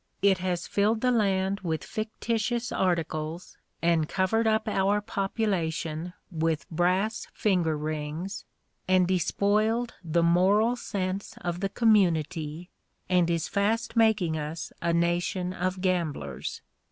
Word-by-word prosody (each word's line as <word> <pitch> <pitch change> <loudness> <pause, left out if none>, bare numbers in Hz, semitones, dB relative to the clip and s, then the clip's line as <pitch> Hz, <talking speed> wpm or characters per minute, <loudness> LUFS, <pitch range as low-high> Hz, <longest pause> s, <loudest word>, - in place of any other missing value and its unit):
It 195 -2 +4
has 180 -1 -2
filled 215 +2 +1
the 250 - +3
land 195 -3 +1
with 160 -4 -2
fictitious 230 +2 -2
articles 165 -2 -2 0.3
and 165 -2 +2
covered 220 +4 +1
up 220 0 +1
our 200 0 +2
population 180 -6 -2 0.2
with 160 -1 -1
brass 185 +6 +1
finger 175 -7 +1
rings, 155 +5 -4 0.4
and 185 -1 +4
despoiled 210 +6 +1
the 170 0 +1
moral 195 +7 +4
sense 195 -4 -3
of 175 0 -3
the 195 +1 -1
community, 175 -6 +1 0.4
and 180 -2 +3
is 170 -1 0
fast 225 +3 0
making 215 -8 +3
us 155 +2 -5
a 170 - +1
nation 175 +2 0
of 185 0 -2
gamblers. 160 - -2
185 Hz, 120 wpm, -27 LUFS, 170-210 Hz, 0.4 s, It